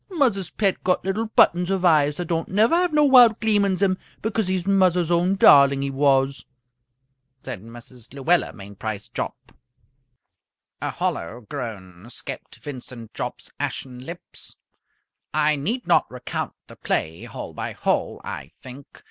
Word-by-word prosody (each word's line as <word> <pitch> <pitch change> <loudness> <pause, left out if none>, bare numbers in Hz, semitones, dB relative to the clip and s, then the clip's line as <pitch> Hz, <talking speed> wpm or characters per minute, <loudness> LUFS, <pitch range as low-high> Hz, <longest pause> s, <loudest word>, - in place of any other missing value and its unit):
"Muzzer's 240 - +1
pet 195 +5 -1
got 185 0 +1
little 210 +4 -1
buttons 180 -4 +3
of 190 -1 0
eyes, 150 -3 +4
that 175 - -3
don't 165 -1 -2
never 215 - +3
have 350 0 +3
no 300 -1 +4
wild 245 -5 +7
gleam 215 -2 +3
in 195 -2 +1
zem 190 -1 +1 0.2
because 220 -2 -1
he's 185 -1 -1
muzzer's 180 -3 +3
own 175 +3 +2
darling, 140 -6 +6
he 140 - -2
was!" 135 0 +2 1.0
said 95 - -6
Mrs. 120 +1 -11
Luella 145 +6 +1
Mainprice 100 +1 -7
Jopp. - - -5 1.3
A - - -1
hollow 100 +9 -3
groan 105 -7 -8
escaped 120 - -7
Vincent 125 -5 -9
Jopp's - - -6
ashen 125 -2 -4
lips. 170 +5 -10 0.8
I 155 0 +3
need 220 - -2
not - - +3
recount 125 -1 -5
the - - -15
play 80 +1 -2
hole - - -8
by - - -5
hole, - - -1
I - - -7
think. 130 +2 -12
165 Hz, 150 wpm, -23 LUFS, 125-195 Hz, 1.3 s, wild